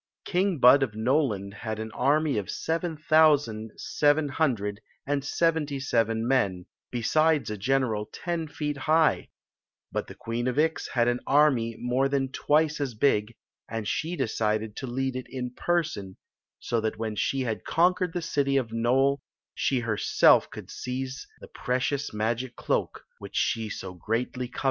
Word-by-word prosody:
King 185 -1 +1
Bud 130 +2 +7
of 120 -6 -1
Noland 110 -5 0
had 110 0 -5
an 110 0 -5
army 145 0 +2
of 100 - -6
seven 165 0 -2
thou 155 -1 +7
sand 110 -5 -6
seven 145 0 +2
hundred 110 -9 -1 0.2
and 140 0 -1
seventy 150 -2 0
seven 115 -3 0
men, 100 -9 +1 0.2
besides 145 +1 +1
a - - -2
general 115 -1 0
ten 170 -2 -3
feet 150 -1 -4
high; 155 +3 +2 0.6
but - - -3
the - - -10
Queen 115 +2 -3
of 125 - -1
Ix 160 +1 +1
had 120 -1 +2
an 120 0 +1
army 135 -6 +3
more 125 +3 0
than 135 -1 0
twice 150 +1 +1
as 130 -5 -2
big, 110 -2 +1 0.3
and 115 -2 -4
she 165 +8 -2
decided 110 -4 -1
to 130 - -5
lead 130 +1 -2
it 130 - -5
in 125 -1 -4
person, 155 - -2 0.4
so 115 -1 -1
that 110 0 -2
when 110 -1 -3
she 135 +6 0
had 110 -6 -3
conquered 180 +1 +2
the 175 - -3
city 140 -4 +1
of 120 -4 -1
Nole 130 +4 +2 0.3
she 130 -3 0
herself 110 -3 +4
could - - -10
seize 130 +1 -5
the - - -10
precious 135 +3 -2
magic 115 +3 -2
cloak - - -2 0.2
which - - -10
she 110 -2 0
so 95 -2 -6
greatly 115 +7 -2
coveted. 125 - -9
130 Hz, 165 wpm, -27 LUFS, 110-145 Hz, 0.6 s, Bud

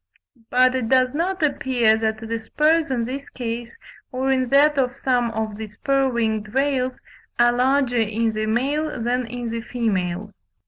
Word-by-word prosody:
But 255 0 +4
it 250 -4 -2
does 255 -1 +3
not 350 +3 -1
appear 250 -6 +2
that 220 0 -2
the 230 0 -2
spurs 305 +7 +1
in 240 -3 -1
this 275 +3 -6
case, 235 - -5 0.3
or 260 +1 0
in 260 -2 +1
that 285 +2 +4
of 255 0 0
some 245 -3 +1
of 220 -2 -4
the 220 0 -5
spur 270 +6 0
winged 220 -2 -2
rails, 265 -2 0 0.4
are 240 0 +5
larger 255 0 +2
in 225 0 0
the 215 0 -2
male 280 +6 -1
than 245 +1 -1
in 240 0 -5
the 230 0 -3
female. 210 -5 -2
245 Hz, 170 wpm, -22 LUFS, 225-270 Hz, 0.4 s, are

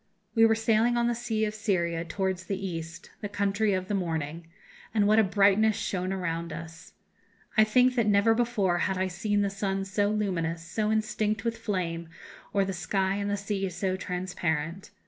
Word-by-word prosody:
We 225 -1 +6
were 225 - +3
sailing 225 +2 +2
on 235 - +2
the 240 - +2
sea 225 -2 -1
of 210 - -3
Syria 175 -6 0
towards 190 +1 -2
the 195 - -2
East 170 -3 -6
the 205 - -4
country 205 +1 +1
of 185 -1 -2
the 205 - -2
morning 165 -3 -2 0.5
and 210 -2 +4
what 215 +1 +5
a - - +6
brightness 205 +2 +4
shone 185 -1 -2
around 170 -3 -2
us! 165 +1 -9 0.6
I 215 - +7
think 250 +4 +4
that 235 -4 +1
never 205 +2 +4
before 225 -7 +1
had 190 +1 0
I 190 - +1
seen 205 +3 0
the 200 - 0
sun 195 -1 -2
so 205 +1 +1
luminous, 175 -6 -1
so 215 +4 -1
instinct 215 -1 0
with 230 0 0
flame, 175 -7 -3 0.4
or 200 -1 +2
the 195 - -3
sky 190 +2 0
and 205 0 -2
the 205 - 0
sea 200 -1 -2
so 185 +1 -1
transparent. 180 -2 -3
195 Hz, 185 wpm, -28 LUFS, 180-215 Hz, 0.6 s, I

